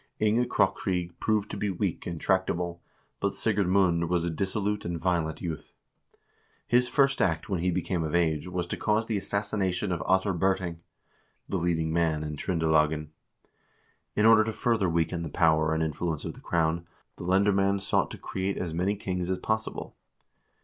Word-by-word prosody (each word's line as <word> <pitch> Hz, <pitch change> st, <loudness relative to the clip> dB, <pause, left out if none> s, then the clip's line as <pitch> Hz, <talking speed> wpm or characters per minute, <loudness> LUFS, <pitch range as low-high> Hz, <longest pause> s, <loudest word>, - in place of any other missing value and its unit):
Inge 110 Hz, +3 st, +2 dB
Krokryg 90 Hz, -2 st, 0 dB
proved 105 Hz, -2 st, 0 dB
to -, -, -4 dB
be 105 Hz, -, -1 dB
weak 95 Hz, -1 st, -2 dB
and 85 Hz, -2 st, -4 dB
tractable, 90 Hz, -2 st, 0 dB, 0.4 s
but -, -, -1 dB
Sigurd 100 Hz, -3 st, +1 dB
Mund 90 Hz, -3 st, +3 dB
was 90 Hz, -1 st, +1 dB
a 85 Hz, -, -1 dB
dissolute 100 Hz, +4 st, -1 dB
and 85 Hz, -1 st, -3 dB
violent 85 Hz, -1 st, -1 dB
youth. 80 Hz, -4 st, -5 dB, 0.9 s
His 125 Hz, +1 st, +3 dB
first 135 Hz, +1 st, +2 dB
act 80 Hz, -1 st, 0 dB
when 95 Hz, -3 st, 0 dB
he 90 Hz, +2 st, +1 dB
became 90 Hz, 0 st, -1 dB
of 80 Hz, +1 st, -2 dB
age 80 Hz, -2 st, +1 dB
was 90 Hz, -1 st, -2 dB
to -, -, -4 dB
cause 105 Hz, +1 st, +1 dB
the 110 Hz, -2 st, -1 dB
assassination 100 Hz, -2 st, -1 dB
of 85 Hz, -, -1 dB
Ottar 95 Hz, +1 st, +3 dB
Birting, 90 Hz, -1 st, 0 dB, 0.7 s
the 95 Hz, -, -1 dB
leading 80 Hz, -2 st, 0 dB
man 80 Hz, -2 st, +1 dB
in 75 Hz, -1 st, -4 dB
Tr0ndelagen. 80 Hz, -2 st, +1 dB, 1.1 s
In 105 Hz, -, +3 dB
order 110 Hz, -1 st, +7 dB
to 110 Hz, 0 st, -3 dB
further 110 Hz, -7 st, +1 dB
weaken 85 Hz, +1 st, 0 dB
the 80 Hz, -, -4 dB
power 80 Hz, 0 st, +3 dB
and 80 Hz, 0 st, +1 dB
influence 80 Hz, 0 st, -2 dB
of -, -, -4 dB
the -, -, -15 dB
crown, 85 Hz, +1 st, 0 dB, 0.3 s
the -, -, -7 dB
lendermaend 100 Hz, +1 st, +2 dB
sought -, -, +1 dB
to -, -, -8 dB
create 95 Hz, +1 st, -3 dB
as 85 Hz, -3 st, -3 dB
many 95 Hz, +5 st, 0 dB
kings 90 Hz, -3 st, -3 dB
as 95 Hz, -, 0 dB
pos 110 Hz, +3 st, -1 dB
sible. -, -, -7 dB
90 Hz, 175 wpm, -28 LUFS, 85-100 Hz, 1.1 s, order